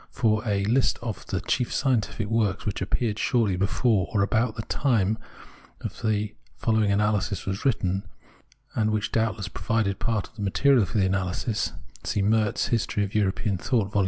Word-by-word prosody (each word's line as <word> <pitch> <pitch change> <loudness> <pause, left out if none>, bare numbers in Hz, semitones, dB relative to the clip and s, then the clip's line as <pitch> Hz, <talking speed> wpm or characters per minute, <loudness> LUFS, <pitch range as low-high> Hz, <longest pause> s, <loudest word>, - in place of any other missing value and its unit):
For 110 -3 +1
a 100 -2 +1
list 125 +5 +2
of 115 -4 -5
the 95 0 -2
chief 125 +2 0
scientific 120 -5 0
works 110 -3 0
which 105 -2 -2
appeared 105 +2 -1
shortly 115 -7 +2
before 100 +2 +1
or 100 -2 +2
about 110 +2 +1
the 110 - -4
time 110 -6 +1 0.6
the 105 -2 -2 0.2
following 110 -3 +2
analysis 105 -1 +1
was 95 +1 -3
written, 95 -7 0 0.7
and 110 -1 +1
which 110 -1 -1
doubtless 110 -3 0
provided 100 0 -1
part 115 -3 -1
of - - -30
the - - -6
material 120 +4 +4
for 110 - -3
the 100 - +4
analysis, 95 +3 -1 0.3
see 100 - 0
Merz, 110 0 +2
History 110 -3 0
of 100 - -4
European 100 -1 0
Thought, 110 -3 0
Vol. 105 - +1
105 Hz, 165 wpm, -26 LUFS, 100-115 Hz, 0.7 s, material